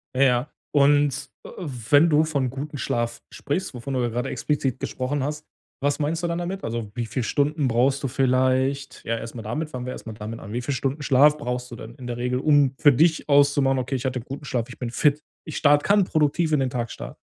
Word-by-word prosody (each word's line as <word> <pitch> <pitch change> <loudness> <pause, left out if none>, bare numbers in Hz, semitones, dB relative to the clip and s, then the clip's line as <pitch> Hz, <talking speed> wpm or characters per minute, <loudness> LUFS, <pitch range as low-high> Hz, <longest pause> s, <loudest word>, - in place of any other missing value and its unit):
Ja, 130 - +1
ja. 125 +1 +2 0.2
Und, 145 0 +3
äh, - - -10 0.4
wenn 145 +4 +6
du 150 0 +4
von 140 -5 -1
guten 145 +4 -6
Schlaf 120 -1 -2
sprichst, 150 +5 -3
wovon 125 +2 -6
du 130 - 0
ja 120 - 0
grade 120 +2 -2
explizit 135 -4 -1
gesprochen 130 +2 -2
hast, 150 +2 -4 0.4
was 145 +1 0
meinst 160 +3 -1
du - - +1
dann 170 0 -2
damit? 180 +3 -4
Also, 115 -2 -4
wie 120 +1 -3
viel 115 +3 -3
Stunden 145 +3 +1
brauchst 130 +4 +2
du - - +1
vielleicht? 130 +2 +1
Ja, 115 0 -1
erst 115 +1 -8
mal 115 - -5
damit 150 +9 -3
fangen 125 -4 -6
wir 125 - -4
erst - - -10
mal 110 - -5
damit 110 +1 -7
an. 100 - -9
Wie 120 +3 -2
viel 140 +4 -2
Stunden 135 +2 -2
Schlaf 145 +2 +5
brauchst 125 -1 -4
du - - -6
denn 115 +1 -10
in 130 - -10
der 120 -1 -4
Regel, 125 +1 -1
um 145 -2 +3
für 145 - +6
dich 160 +4 +2
auszumachen: 140 -2 +4
„Okay, 130 +2 -2
ich 130 0 -4
hatte 130 -1 -1
guten 135 +4 -8
Schlaf, 120 -4 -2
ich - - -10
bin 120 -2 -4
fit. 145 +3 +2 0.2
Ich 155 - -5
start 145 -1 +4
kann 205 0 +4
produktiv 155 -1 +1
in 150 - +3
den 130 -1 +1
Tag 120 -2 -3
starten.” - - -8
135 Hz, 240 wpm, -24 LUFS, 125-145 Hz, 0.4 s, wenn